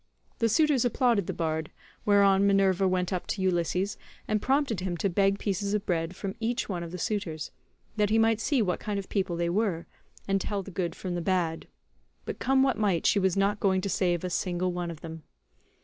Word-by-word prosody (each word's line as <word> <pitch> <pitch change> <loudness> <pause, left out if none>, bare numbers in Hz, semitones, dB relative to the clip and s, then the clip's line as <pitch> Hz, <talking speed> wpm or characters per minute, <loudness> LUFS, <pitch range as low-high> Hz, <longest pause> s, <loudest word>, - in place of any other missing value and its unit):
The 230 - +2
suitors 290 +2 +3
applauded 240 -5 +2
the - - -1
bard, 160 -1 -2 0.4
whereon 200 -1 +5
Minerva 195 -1 +3
went 185 0 0
up 180 - -3
to 195 - -2
Ulysses 180 +2 0 0.3
and 215 -1 0
prompted 270 -6 +1
him 180 -2 -3
to 195 +2 0
beg 195 +2 +2
pieces 200 0 -1
of 210 0 -2
bread 170 0 -1
from 195 0 -4
each 235 +3 -1
one 180 -4 -3
of 170 -1 -6
the 180 - -5
suitors, 175 -5 -3 0.5
that 210 -1 +2
he 220 - +3
might 225 -1 +3
see 265 -3 +2
what 180 -3 -1
kind 210 -2 -3
of 195 - -5
people 190 -4 -1
they 170 0 0
were, 190 -4 0 0.4
and 195 0 +1
tell 200 0 -2
the 195 - -10
good 175 -2 -2
from 185 -2 -5
the 175 - -2
bad; 170 -3 -1 0.6
but - - -5
come 265 +1 +3
what 265 -4 +1
might 195 -6 +1
she 205 - +4
was 190 -1 +1
not 200 +1 +2
going 190 -2 +2
to 200 - -3
save 175 -3 0
a 180 - -3
single 180 0 -1
one 175 -1 -3
of 165 -2 -8
them. 160 -1 -8
195 Hz, 215 wpm, -28 LUFS, 175-210 Hz, 0.6 s, whereon